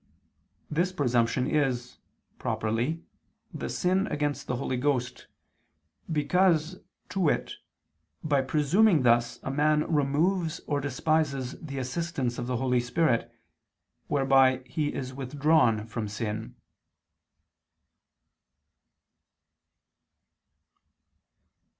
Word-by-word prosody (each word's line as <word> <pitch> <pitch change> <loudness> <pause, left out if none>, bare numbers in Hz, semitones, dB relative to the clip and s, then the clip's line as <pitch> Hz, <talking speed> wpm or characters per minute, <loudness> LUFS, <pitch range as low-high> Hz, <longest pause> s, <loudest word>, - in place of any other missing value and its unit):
This 175 +4 +1
presumption 125 -6 +1
is, 125 -5 -1 0.4
properly, 115 +10 -1 0.5
the - - -4
sin 190 +3 +1
against 145 -3 -2
the 125 - -1
Holy 130 +1 -2
Ghost, 125 -1 -1 0.8
because, 170 +2 +2 0.3
to 195 - -4
wit, 170 -5 0 0.7
by 145 -3 +2
presuming 155 +5 +3
thus 120 0 +2
a 135 - -3
man 150 +2 +2
removes 160 +4 +1
or 145 -1 -1
despises 140 -1 0
the 140 -4 -7
assistance 130 -1 -2
of 120 - -4
the 125 -1 -1
Holy 125 0 +1
Spirit, 125 0 0 0.8
whereby 135 -2 +3
he 150 0 -2
is 130 -1 -5
withdrawn 135 -4 +2
from 115 -1 -4
sin. 105 +1 -4
140 Hz, 90 wpm, -28 LUFS, 125-155 Hz, 0.8 s, presuming